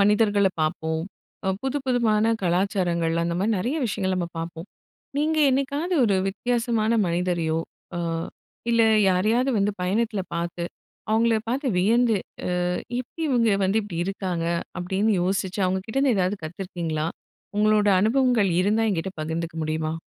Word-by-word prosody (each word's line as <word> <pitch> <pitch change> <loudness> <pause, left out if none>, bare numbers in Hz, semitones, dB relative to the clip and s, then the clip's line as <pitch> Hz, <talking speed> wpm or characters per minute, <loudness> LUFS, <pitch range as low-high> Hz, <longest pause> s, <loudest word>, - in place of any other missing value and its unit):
மனிதர்கள 205 0 +4
பாப்போம். 160 +1 -1 0.4
அ - - +2
புதுப்புதுமான 245 -5 +1
கலாச்சாரங்கள்லாம். 175 -2 +1
அந்த 170 0 -1
மாரி 215 +3 +1
நெறைய 245 +11 -1
விஷயங்கள் 190 -4 -1
நம்ம 175 -2 -2
பாப்போம். 165 +2 -6 0.5
நீங்க 310 +1 +1
என்னைக்காவது 280 +7 0
ஒரு 200 -3 +3
வித்தியாசமான 230 +1 0 0.2
மனிதரையோ, 170 -2 0 0.4
அ - - -2 0.7
இல்ல 230 -1 +4 0.3
யாரையாவது 220 +8 +2
வந்து 200 +1 +2
பயணத்தில 210 +3 0
பாத்து, 170 0 -3 0.5
அவுங்கள 225 +1 +3
பாத்து 270 +4 -1
வியந்து 230 +3 +3 0.5
"அ - - 0 0.3
இபடி 255 +6 -6
இவுங்க 235 -4 +3
வந்து 195 +4 +2
இப்டி 195 -5 -6
இருக்காங்க?" 185 -4 -2 0.3
அப்படின்னு 190 +5 +1
யோசிச்சு, 190 +1 -1
அவுங்க 190 +1 -1
கிட்டேருந்து 270 +2 +2
ஏதாவது 185 +2 +1
கத்துருக்கீங்களா? 165 -2 -3 0.5
உங்களோட 210 0 +4
அனுபவங்கள் 230 -2 +3
இருந்தா 210 +4 +2
என்கிட்ட 190 0 -2
பகிர்ந்துக்க 165 +1 -4
முடியுமா? 155 0 -1
200 Hz, 130 wpm, -24 LUFS, 175-230 Hz, 0.7 s, மனிதர்கள